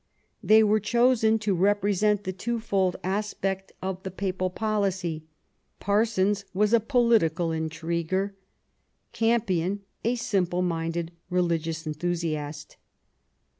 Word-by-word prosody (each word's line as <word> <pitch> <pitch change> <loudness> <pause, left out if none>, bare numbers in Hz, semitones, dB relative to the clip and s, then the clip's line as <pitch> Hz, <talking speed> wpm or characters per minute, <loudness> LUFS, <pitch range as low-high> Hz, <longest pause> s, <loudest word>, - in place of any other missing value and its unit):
They 220 +1 +6
were 215 0 +3
chosen 225 0 +3
to 210 -2 0
represent 205 +2 +2
the 185 -1 -3
two 235 +5 -3
fold 195 -5 0
aspect 195 -1 -2
igS - - -24
QUEEN 185 - -3
ELIZABETH. 190 -1 -3
of - - -32
the 190 - -4
Papal 185 0 -2
policy; 190 -6 -1 0.5
Parsons 205 -1 +1
was 210 +3 +2
a 235 - +7
political 220 - +2
intriguer, 170 +4 -2 0.8
Campion 205 -5 +1 0.2
a 235 +2 +1
simple 180 -6 0
minded 165 -1 -2 0.2
religious 165 -2 -1
enthusiast. 155 -2 -3
190 Hz, 120 wpm, -26 LUFS, 170-210 Hz, 0.8 s, a